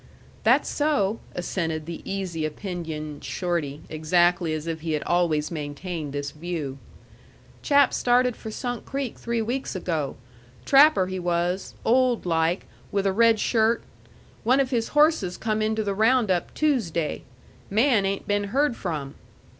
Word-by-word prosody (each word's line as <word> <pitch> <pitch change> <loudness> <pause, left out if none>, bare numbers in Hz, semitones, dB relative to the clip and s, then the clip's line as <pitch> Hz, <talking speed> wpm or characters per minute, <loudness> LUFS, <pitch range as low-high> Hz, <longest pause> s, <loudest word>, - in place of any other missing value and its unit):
"That's - - +4
so," 280 -9 +1 0.2
assented 160 -3 -2
the 170 0 -6
easy 185 -4 -3
opinioned 155 -2 -5
Shorty, 165 -6 -2
exactly 175 +2 +2
as 155 0 -3
if 165 -1 -4
he 160 -1 -2
had 150 - -1
always 170 -3 +1
maintained 150 0 -5
this 145 0 -4
view. 150 -4 -5 0.8
"Chap 285 -2 +4
started 250 0 +2
for 220 - -8
Sunk 245 +1 -4
Creek 275 -3 -4
three 235 -1 -1
weeks 245 0 -3
ago. 165 -6 -2 0.5
Trapper 275 -8 +6
he 185 0 -4
was; 175 +1 -1
old 250 -2 +3
like, 165 +1 +1 0.3
with 200 -1 0
a 195 - +2
red 230 +1 +4
shirt. 225 +1 +2 0.6
One 255 +4 +4
of 270 -1 +1
his 230 -3 0
horses 295 - +3
come 215 -1 -1
into 220 0 0
the 200 -1 -1
round 220 +1 +3
up 175 -1 0
Toosday. 200 - 0 0.5
Man 225 +1 +3
ain't 195 0 -2
been 205 0 +1
heard 270 +5 +1
from." 150 -9 -4
190 Hz, 145 wpm, -25 LUFS, 165-230 Hz, 0.8 s, Trapper